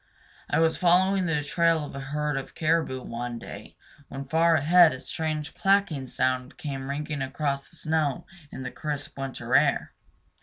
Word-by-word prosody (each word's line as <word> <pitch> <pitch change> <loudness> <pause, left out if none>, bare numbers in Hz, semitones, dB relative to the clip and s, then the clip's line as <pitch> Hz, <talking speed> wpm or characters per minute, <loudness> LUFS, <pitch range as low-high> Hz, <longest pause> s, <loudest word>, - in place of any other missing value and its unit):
I 145 - +1
was 160 0 +3
following 185 +1 +3
the 150 -3 0
trail 165 +1 +2
of - - -9
a 140 - -6
herd 150 +2 -2
of 135 -1 -5
caribou 155 -5 0
one 120 0 -5
day, - - -10 0.3
when 135 0 -7
far 165 +4 +3
ahead 160 +1 +6
a 130 - -7
strange 155 +1 -3
clacking 195 -9 +1
sound 130 0 -1
came 140 -5 -5
ringing 145 0 -3
across 140 +1 -2
the - - -13
snow 155 -3 -1 0.3
in 130 - -7
the 125 - -5
crisp 150 -2 -4
winter 135 -1 -5
air. - - +3
150 Hz, 165 wpm, -27 LUFS, 135-165 Hz, 0.3 s, ahead